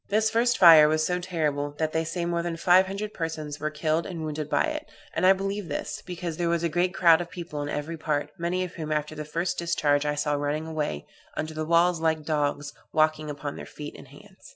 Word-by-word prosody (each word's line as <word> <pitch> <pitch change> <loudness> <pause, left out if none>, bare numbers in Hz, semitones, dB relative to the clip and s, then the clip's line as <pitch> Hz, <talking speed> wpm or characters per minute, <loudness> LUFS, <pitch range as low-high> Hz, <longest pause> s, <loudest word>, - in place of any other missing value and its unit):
This 215 +2 +2
first 240 +2 +2
fire 160 -4 +9
was 155 +1 +1
so 180 0 0
terrible, 150 -5 -2
that 155 0 -1
they 160 - +1
say 170 +2 -3
more 170 0 0
than 170 -1 -3
five 180 +2 +5
hundred 205 +2 -5
persons 155 -3 -4
were 155 +1 -1
killed 155 +2 -1
and 170 -4 -5
wounded 155 -1 -4
by - - +2
it. 310 0 -3 0.3
And 185 - +2
I 190 - +8
believe 195 0 -3
this, 145 - -4
because 175 -2 -5
there 170 -1 0
was 170 0 0
a 170 - +1
great 175 +3 +1
crowd 170 -3 +5
of 175 - -6
people 170 -5 -6
in 145 - -4
every 150 +3 -4
part, 150 -2 -2
many 175 +2 -1
of 180 - -6
whom, 155 -2 -5
after 150 0 -1
the 155 0 -6
first 170 +4 -2
discharge, 150 -4 +1
I 150 0 -1
saw 145 0 0
running 145 +2 -1
away, 150 - -3 0.3
under 155 0 -3
the 155 0 -3
walls, 170 +1 +3
like 160 -2 0
dogs, 145 -1 -1 0.2
walking 155 -1 +1
upon 145 0 -5
their - - -8
feet 150 -1 -8
and - - -12
hands. - - -16
160 Hz, 235 wpm, -26 LUFS, 150-175 Hz, 0.3 s, fire